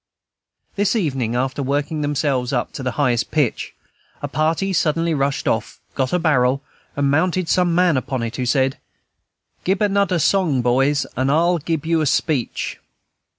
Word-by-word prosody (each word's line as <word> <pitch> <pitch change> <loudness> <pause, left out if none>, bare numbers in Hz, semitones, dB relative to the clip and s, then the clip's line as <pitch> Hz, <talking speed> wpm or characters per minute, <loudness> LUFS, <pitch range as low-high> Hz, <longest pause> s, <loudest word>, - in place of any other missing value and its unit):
This 205 +3 +1
evening, 135 - -1
after 130 +3 -1
working 145 +3 -1
themselves 140 -3 0
up 125 -3 -1
to - - -7
the 130 -1 -2
highest 125 -5 +1
pitch, 145 -7 -1 0.5
a - - -1
party 165 +5 0
suddenly 165 0 +1
rushed 140 -1 -1
off, 110 0 -1
got 130 -2 -1
a 180 - +2
barrel, 140 -5 +2 0.3
and 140 -1 +1
mounted 180 +3 +1
some 175 -1 +2
man 175 -4 +3
upon 130 -1 -2
it, 115 0 -4
who 125 - -2
said, 135 +1 +1 0.8
"Gib 190 +1 +1
anoder 200 -3 +1
song, 160 -6 +2
boys, 135 +4 +2
and 130 +1 0
I'se 170 +2 +2
gib 160 -2 -1
you 165 0 +1
a 155 - +1
speech." 135 -3 -1
145 Hz, 160 wpm, -20 LUFS, 130-170 Hz, 0.8 s, man